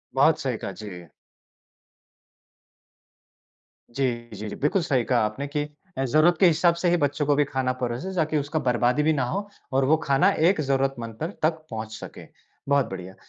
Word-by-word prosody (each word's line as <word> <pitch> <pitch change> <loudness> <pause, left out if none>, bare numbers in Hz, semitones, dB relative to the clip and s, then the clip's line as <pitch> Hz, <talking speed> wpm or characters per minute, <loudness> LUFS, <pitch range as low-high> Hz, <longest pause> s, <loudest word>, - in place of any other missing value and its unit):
बहुत 145 +4 +4
सही 125 -4 -2
कहा, 100 - -5
जी। 90 -3 -9 2.9
जी, 120 -3 -1
जी, 105 +2 -6
जी - - -6
बिल्कुल 150 +6 +1
सही 135 -7 +1
कहा 120 0 +2
आपने 130 +7 -4
कि 145 +1 -2 0.3
अ, 135 - 0
ज़रूरत 155 +6 +4
के 190 - +6
हिसाब 170 +1 +4
से 175 +1 +1
ही 175 - +3
बच्चों 145 0 0
को 145 0 +3
भी 145 - +4
खाना 130 -2 -1
परोसे 125 +10 -3
ताकि 155 -3 +1
उसका 145 +2 -1
बर्बादी 125 +3 +2
भी 160 +1 +3
ना 135 -4 0
हो 200 +5 -3 0.3
और 135 0 +3
वो 155 +3 +5
खाना 140 +7 +4 0.2
एक 190 - +1
ज़रूरतमंद 135 -4 -1
पर 160 +5 -3
तक 160 - +4 0.2
पहुँच 110 -1 -5
सके। - - -10 0.4
बहुत 140 -2 +4
बढ़िया। 95 0 -7
140 Hz, 180 wpm, -25 LUFS, 120-155 Hz, 2.9 s, के